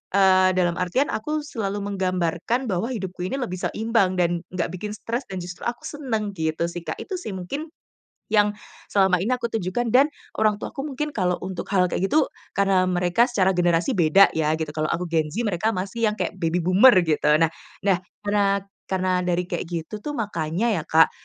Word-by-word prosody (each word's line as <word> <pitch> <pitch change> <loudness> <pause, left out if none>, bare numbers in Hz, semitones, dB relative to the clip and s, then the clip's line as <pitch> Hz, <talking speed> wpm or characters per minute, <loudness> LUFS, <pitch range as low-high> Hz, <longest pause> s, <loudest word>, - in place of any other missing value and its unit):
eee, 185 -1 +5
dalam 175 -2 +2
artian 215 - +1
aku 300 +8 -2
selalu 205 -7 -3
menggambarkan 185 +4 -1
bahwa 185 +5 0
hidupku 190 -6 -5
ini 265 - -3
lebih 185 -9 -3
seimbang 220 -4 +1
dan 175 -1 +1 0.2
nggak 175 -1 -1
bikin 205 +3 -5
stres 230 +4 -3
dan 190 - -5
justru 180 0 -9
aku 240 - -8
seneng 225 -8 -3
gitu 160 -2 -1
sih 170 0 -5
Kak. - - -4
Itu 385 - -5
sih 205 - -5
mungkin 280 - -5 0.6
yang 210 -1 +3 0.3
selama 190 -2 +3
ini 225 +8 +1
aku 235 -2 -3
tunjukan 225 +3 -1
dan 265 +5 +6 0.3
orang 215 -1 +3
tuaku 275 +2 -5
mungkin 300 +2 -3
kalau 180 -7 0
untuk 185 -1 -5
hal 180 -1 +3
kayak 190 - 0
gitu, 305 +9 +2 0.2
karena 195 -2 +3
mereka 180 +6 +2
secara 200 -7 +2
generasi 175 -2 +2
beda 170 +4 +6
ya 155 0 +2
gitu, 160 -1 -3
kalau 155 +1 -1
aku 180 +3 -1
Gen 160 -2 +2
Z, 235 - 0
mereka 215 +1 0
masih 200 +5 -1
yang 210 - +1
kayak 205 - -3
baby 170 0 0
boomer 195 +9 +7
gitu. 160 -3 0 0.2
Nah 165 - +3 0.3
nah, 195 -2 +3 0.2
karena 200 -1 +1 0.2
karena 185 -1 -1 0.2
dari 180 0 -1
kayak - - -2
gitu 170 +5 -5
tuh 295 +7 -5
makanya 205 - -1
ya - - -3
Kak, 160 +1 +5
190 Hz, 190 wpm, -24 LUFS, 175-220 Hz, 0.6 s, boomer